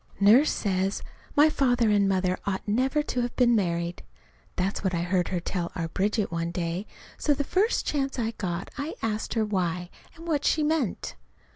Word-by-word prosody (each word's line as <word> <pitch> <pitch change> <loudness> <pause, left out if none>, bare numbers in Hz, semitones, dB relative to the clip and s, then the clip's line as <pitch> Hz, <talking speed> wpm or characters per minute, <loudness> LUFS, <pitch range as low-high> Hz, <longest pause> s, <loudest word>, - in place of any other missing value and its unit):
Nurse 225 +9 +6
says 195 -1 -1 0.3
my 295 +2 +7
father 245 -7 +2
and 200 -1 +3
mother 185 -1 +1
ought 195 0 -2
never 265 +8 +1
to 250 -4 -2
have 240 0 -3
been 245 -2 +4
married. 170 -3 -1 0.5
That's 190 +3 -1
what 190 -2 0
I 170 - 0
heard 180 0 +1
her 180 - -1
tell 175 0 -3
our 165 -3 -2
Bridget 205 +3 0
one 170 0 -1
day. 170 +3 -3 0.3
So 290 - +2
the 285 - -1
first 395 - +1
chance 275 -2 -1
I 230 -2 0
got 180 -4 -4
I 290 +3 -3
asked 220 +1 -2
her 220 -1 +2
why, 180 -3 -2 0.2
and 330 +1 -11
what 295 -3 0
she 310 - +2
meant. 300 - -1
205 Hz, 185 wpm, -27 LUFS, 180-260 Hz, 0.5 s, my